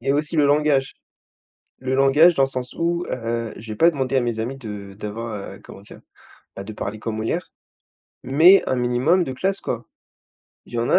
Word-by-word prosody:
et 135 Hz, -, 0 dB
aussi 150 Hz, +3 st, -1 dB
le 145 Hz, -, +4 dB
langage. 145 Hz, -2 st, +2 dB, 0.9 s
Le 130 Hz, 0 st, -2 dB
langage 140 Hz, +6 st, +5 dB
dans 135 Hz, -, +2 dB
le 135 Hz, -, -3 dB
sens 125 Hz, -2 st, -5 dB
où, 170 Hz, +1 st, -1 dB
heu, 115 Hz, -1 st, -3 dB
j'ai 110 Hz, -1 st, -8 dB
pas 170 Hz, +9 st, +5 dB
demandé 135 Hz, -3 st, -1 dB
à -, -, +4 dB
mes 120 Hz, -2 st, -2 dB
amis 130 Hz, +4 st, -4 dB
de 105 Hz, -5 st, -8 dB
d'avoir, 110 Hz, +2 st, -6 dB, 0.2 s
heu, -, -, -13 dB
comment 95 Hz, -, -12 dB
dire? 100 Hz, -, -12 dB, 0.6 s
Bah, 95 Hz, -, -6 dB
de 105 Hz, -, -8 dB
parler 105 Hz, +1 st, -5 dB
comme 110 Hz, 0 st, -4 dB
Molière. 120 Hz, +5 st, -3 dB, 0.7 s
Mais 160 Hz, +9 st, +6 dB
un 130 Hz, -, 0 dB
minimum 125 Hz, +9 st, +2 dB
de 130 Hz, -, -5 dB
classe 190 Hz, +9 st, -1 dB
quoi! 120 Hz, -2 st, -4 dB, 0.8 s
Il -, -, -17 dB
y 120 Hz, -, -1 dB
en 120 Hz, -, -1 dB
a -, -, +2 dB
130 Hz, 200 wpm, -22 LUFS, 115-150 Hz, 0.9 s, Mais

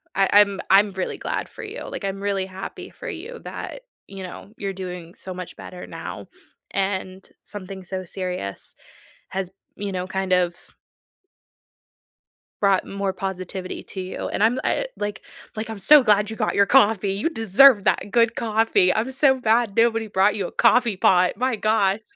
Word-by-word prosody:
I 195 Hz, 0 st, +3 dB
I'm 200 Hz, -1 st, +5 dB
I'm 200 Hz, +1 st, +5 dB
really 190 Hz, -1 st, -3 dB
glad -, -, -3 dB
for -, -, -10 dB
you. -, -, -7 dB
Like, -, -, -5 dB
I'm 195 Hz, 0 st, -3 dB
really 200 Hz, -1 st, -1 dB
happy 190 Hz, 0 st, -8 dB
for -, -, -8 dB
you 450 Hz, +5 st, -7 dB
that, -, -, -7 dB, 0.3 s
you 195 Hz, -1 st, -8 dB
know, 185 Hz, +2 st, -9 dB
you're 195 Hz, -1 st, -3 dB
doing 180 Hz, -2 st, -7 dB
so 185 Hz, -, -8 dB
much 180 Hz, -1 st, -8 dB
better 180 Hz, -, -9 dB
now, -, -, -7 dB, 0.4 s
and 190 Hz, -1 st, -2 dB, 0.2 s
something 195 Hz, -2 st, -7 dB
so 185 Hz, +1 st, -5 dB
serious 180 Hz, -, -3 dB, 0.5 s
has, 190 Hz, -1 st, -3 dB, 0.3 s
you 200 Hz, -1 st, -4 dB
know, 180 Hz, -1 st, -3 dB
kind 190 Hz, 0 st, -2 dB
of 180 Hz, -1 st, +3 dB, 2.1 s
brought 195 Hz, -2 st, +3 dB
more 200 Hz, -1 st, -2 dB
positivity 190 Hz, -1 st, -5 dB
to 190 Hz, -, -9 dB
you, 185 Hz, 0 st, -5 dB
and -, -, -1 dB
I'm 225 Hz, +2 st, +4 dB
the 260 Hz, -, -3 dB
I -, -, 0 dB
like 205 Hz, 0 st, -4 dB, 0.3 s
like, 220 Hz, +1 st, -4 dB
I'm 220 Hz, -2 st, -7 dB
so 295 Hz, +7 st, +7 dB
glad 210 Hz, -2 st, +3 dB
you 220 Hz, -, -5 dB
got -, -, -1 dB
your 200 Hz, 0 st, +4 dB
coffee. 210 Hz, -6 st, +4 dB
You 200 Hz, +9 st, -1 dB
deserve 225 Hz, -, +5 dB
that 205 Hz, -, +1 dB
good 230 Hz, -1 st, +3 dB
coffee. 220 Hz, -4 st, +2 dB
I'm 225 Hz, +4 st, -1 dB
so 265 Hz, -1 st, +3 dB
mad 225 Hz, -2 st, +2 dB
nobody 225 Hz, -1 st, +3 dB
brought 200 Hz, 0 st, +2 dB
you 200 Hz, -3 st, -2 dB
a -, -, -6 dB
coffee 235 Hz, -2 st, +3 dB
pot, 185 Hz, -1 st, +3 dB
my 255 Hz, 0 st, 0 dB
gosh. 215 Hz, -1 st, +1 dB
200 Hz, 175 wpm, -23 LUFS, 190-225 Hz, 2.1 s, so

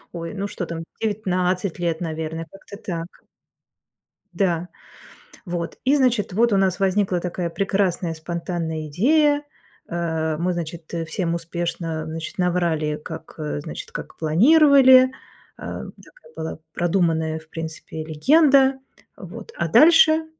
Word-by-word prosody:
Ой, 165 Hz, +1 st, -5 dB
ну 200 Hz, +1 st, -3 dB
что 180 Hz, -3 st, -5 dB
там, 165 Hz, -1 st, -5 dB, 0.2 s
19 185 Hz, -4 st, -1 dB
лет, 170 Hz, -2 st, -1 dB
наверное, 160 Hz, -1 st, -4 dB
как-то 195 Hz, +1 st, -12 dB
так. 170 Hz, -4 st, -7 dB, 1.1 s
Да, 175 Hz, -2 st, 0 dB, 0.8 s
вот, 175 Hz, -2 st, -4 dB
и 270 Hz, +3 st, +3 dB
значит, 250 Hz, -8 st, +2 dB
вот 230 Hz, +2 st, +3 dB
у -, -, +4 dB
нас 190 Hz, -1 st, +1 dB
возникла 190 Hz, -1 st, +1 dB
такая 175 Hz, 0 st, -3 dB
прекрасная 190 Hz, -2 st, 0 dB
спонтанная 165 Hz, -1 st, -4 dB
идея, 290 Hz, -, +3 dB, 0.5 s
э. 160 Hz, -2 st, -1 dB
Мы, 180 Hz, +2 st, 0 dB
значит, 165 Hz, -1 st, -6 dB
всем 170 Hz, +1 st, -2 dB
успешно, 170 Hz, -1 st, -3 dB
значит, 160 Hz, 0 st, -6 dB
наврали, 170 Hz, -4 st, 0 dB
как, 160 Hz, -1 st, -8 dB
э, 150 Hz, -1 st, -3 dB
значит, 155 Hz, -, -8 dB
как -, -, -7 dB
планировали, 260 Hz, -, +6 dB, 0.5 s
э. -, -, -6 dB, 0.2 s
Такая -, -, -20 dB
была 160 Hz, -, -5 dB
продуманная, 165 Hz, -3 st, 0 dB
в 160 Hz, 0 st, -20 dB
принципе, 160 Hz, -1 st, -6 dB
легенда, 270 Hz, -, +4 dB, 0.4 s
вот, -, -, -10 dB
а -, -, 0 dB
дальше, 320 Hz, 0 st, +6 dB
175 Hz, 125 wpm, -22 LUFS, 160-205 Hz, 1.1 s, планировали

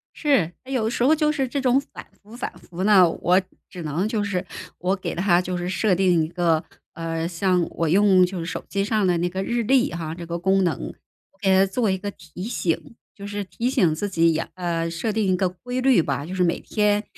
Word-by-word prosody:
是， 275 Hz, -, +2 dB
诶， 270 Hz, -, -6 dB
有 250 Hz, -4 st, +1 dB
的 -, -, +1 dB
时 235 Hz, -, -1 dB
候 295 Hz, +5 st, +5 dB
就 305 Hz, -1 st, +2 dB
是 275 Hz, -3 st, -1 dB
这 275 Hz, +3 st, -2 dB
种 260 Hz, 0 st, +3 dB
反 280 Hz, -, -11 dB, 0.2 s
复 210 Hz, +3 st, -14 dB
反 250 Hz, -, -4 dB
复 180 Hz, +1 st, -6 dB
呢， 195 Hz, -4 st, +6 dB
我 180 Hz, +3 st, +2 dB, 0.3 s
只 180 Hz, -, -8 dB
能 160 Hz, +6 st, -1 dB
就 215 Hz, -1 st, -1 dB
是 195 Hz, -2 st, -2 dB, 0.3 s
我 185 Hz, +2 st, +1 dB
给 190 Hz, -, -5 dB
它 175 Hz, -1 st, +3 dB
就 180 Hz, 0 st, -3 dB
是 175 Hz, 0 st, -3 dB
设 190 Hz, +1 st, +1 dB
定 180 Hz, -2 st, +3 dB
一 -, -, -2 dB
个， 170 Hz, -2 st, +1 dB, 0.3 s
呃， 165 Hz, 0 st, -3 dB
像 180 Hz, 0 st, +1 dB
我 165 Hz, -, -1 dB
用 190 Hz, +1 st, +5 dB
就 180 Hz, 0 st, -5 dB
是 165 Hz, -, -4 dB
手 -, -, -5 dB
机 200 Hz, -1 st, -1 dB
上 210 Hz, -1 st, +1 dB
的 175 Hz, -1 st, +2 dB
那 175 Hz, +1 st, 0 dB
个 190 Hz, +2 st, -3 dB
日 235 Hz, +3 st, -1 dB
历 255 Hz, +2 st, +3 dB
哈， 165 Hz, -2 st, -4 dB
这 170 Hz, +1 st, -8 dB
个 170 Hz, 0 st, -4 dB
功 190 Hz, +2 st, +2 dB
能， 170 Hz, -3 st, -1 dB, 0.4 s
我 -, -, -32 dB
给 195 Hz, -, +1 dB
它 190 Hz, +1 st, +5 dB
做 210 Hz, +3 st, 0 dB
一 190 Hz, -, +1 dB
个 205 Hz, +2 st, -5 dB
提 175 Hz, 0 st, -10 dB
醒， 205 Hz, -1 st, -2 dB, 0.2 s
就 200 Hz, -, -9 dB
是 205 Hz, 0 st, -4 dB
提 235 Hz, +6 st, -2 dB
醒 175 Hz, -11 st, +2 dB
自 205 Hz, +6 st, -3 dB
己 165 Hz, -3 st, +3 dB
也 160 Hz, -, 0 dB
呃， 170 Hz, -2 st, -2 dB
设 170 Hz, +7 st, -2 dB
定 215 Hz, -1 st, 0 dB
一 185 Hz, -, +3 dB
个 185 Hz, -, +2 dB
规 245 Hz, +8 st, -5 dB
律 255 Hz, -7 st, +4 dB
吧。 140 Hz, -2 st, -2 dB
就 180 Hz, +3 st, -6 dB
是 185 Hz, -, +2 dB
每 170 Hz, -1 st, +1 dB
天 210 Hz, -1 st, +1 dB
185 Hz, 260 characters per minute, -23 LUFS, 170-215 Hz, 0.4 s, 呢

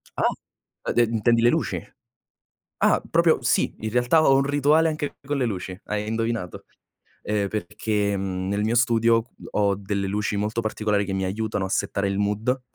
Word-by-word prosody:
Ah! -, -, +2 dB, 0.6 s
E -, -, 0 dB
de 120 Hz, -, +4 dB
intendi 115 Hz, +1 st, +2 dB
le 120 Hz, -, +5 dB
luci? -, -, -1 dB, 1.0 s
Ah, -, -, +3 dB
proprio -, -, +3 dB
sì, -, -, +1 dB
in 110 Hz, -, -3 dB
realtà 125 Hz, +7 st, +3 dB
ho 135 Hz, -, +5 dB
un 135 Hz, -, +3 dB
rituale 145 Hz, +3 st, +3 dB
anche 150 Hz, -2 st, -4 dB
con 145 Hz, +1 st, -1 dB
le 130 Hz, -, +1 dB
luci. 95 Hz, -4 st, -4 dB
Hai 105 Hz, 0 st, -3 dB
indovinato, 115 Hz, -5 st, -3 dB, 0.6 s
ehm, 105 Hz, -1 st, 0 dB
perché, 105 Hz, +1 st, -1 dB
mhmm, 95 Hz, -1 st, -3 dB
nel 100 Hz, +1 st, 0 dB
mio 110 Hz, +2 st, +1 dB
studio 115 Hz, -2 st, +3 dB, 0.3 s
ho 100 Hz, -1 st, +2 dB
delle 100 Hz, 0 st, -3 dB
luci 105 Hz, +1 st, -1 dB
molto 110 Hz, +3 st, -1 dB
particolari 105 Hz, -2 st, 0 dB
che 95 Hz, -, -3 dB
mi 95 Hz, 0 st, -1 dB
aiutano 105 Hz, 0 st, -2 dB
a -, -, -5 dB
settare 100 Hz, +1 st, -1 dB
il 100 Hz, 0 st, -1 dB
mood. 105 Hz, +6 st, 0 dB
110 Hz, 180 wpm, -24 LUFS, 100-120 Hz, 1.0 s, le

